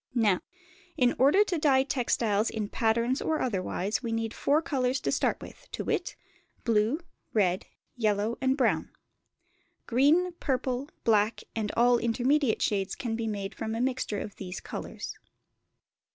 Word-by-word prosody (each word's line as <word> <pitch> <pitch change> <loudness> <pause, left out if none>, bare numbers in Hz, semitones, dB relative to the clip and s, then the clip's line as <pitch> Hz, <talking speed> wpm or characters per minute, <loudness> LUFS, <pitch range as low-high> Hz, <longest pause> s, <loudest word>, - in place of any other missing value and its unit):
Now, 210 -6 +3 0.6
in 245 -1 +4
order 290 +11 +6
to 360 -5 -2
dye 270 -3 +4
textiles 230 -5 +1
in 215 -2 -3
patterns 235 +3 +1
or 315 -1 0
otherwise, 200 -2 -1
we 235 -2 -3
need 225 0 -2
four 290 +2 +2
colours 260 -4 0
to - - 0
start - - +1
with - - -12
to - - -3
wit, - - -1 0.5
blue, 230 +7 +2 0.3
red, 185 -4 +1 0.3
yellow, 215 -1 +1
and 265 +1 +2
brown; 265 - +1 1.0
green, 300 +9 +3
purple, 260 +1 -1
black, 215 0 +2
and 215 -2 -1
all 240 0 +5
intermediate 250 +2 +1
shades 195 -2 0
can 230 -3 -3
be 225 0 -2
made 200 -2 -3
from 220 +2 -4
a - - -2
mixture 250 -5 -1
of 205 - -7
these 185 -1 -6
colours. - - -7
235 Hz, 150 wpm, -28 LUFS, 215-265 Hz, 1.0 s, order